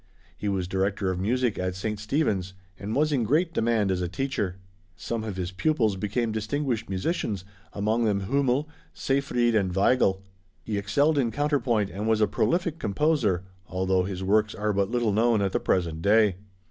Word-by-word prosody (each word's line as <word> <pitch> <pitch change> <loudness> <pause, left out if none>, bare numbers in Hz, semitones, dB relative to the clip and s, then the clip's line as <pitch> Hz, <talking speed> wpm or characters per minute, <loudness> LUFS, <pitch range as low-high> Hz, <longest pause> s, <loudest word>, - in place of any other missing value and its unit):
He 105 - -3
was 95 -3 -1
director 95 +1 0
of 90 - -3
music 120 +3 0
at 90 0 -2
St. 105 +2 -3
Stephen's 105 - -1 0.2
and 105 +3 -4
was 150 +2 +2
in 135 -4 +1
great 160 - +1
demand 110 - +1
as 90 -1 -1
a 90 - -1
teacher. 95 -1 -2 0.4
Some 115 0 -4
of 105 -4 -5
his 90 -1 -3
pupils 110 -1 +1
became 110 +4 -1
distinguished 115 +2 -2
musicians, 100 - -2 0.3
among 110 +3 0
them 100 -2 +1
Hümmel, 135 +6 +1 0.3
Seyfried 125 -3 +1
and 100 -4 +1
Weigl. 95 -2 +3 0.4
He 105 -2 -2
excelled 140 +10 +2
in 120 -4 +2
counterpoint, 120 -5 0
and 105 +3 -4
was 110 -1 +3
a 105 - +5
prolific 165 - 0
composer, 105 - +1 0.2
although 95 +1 +1
his 95 0 -4
works 105 +2 +2
are 105 0 -1
but 100 0 +1
little 120 -2 +1
known 115 +1 +3
at 100 -1 0
the - - 0
present 85 -3 0
day. 105 -1 +4
105 Hz, 175 wpm, -26 LUFS, 95-125 Hz, 0.4 s, a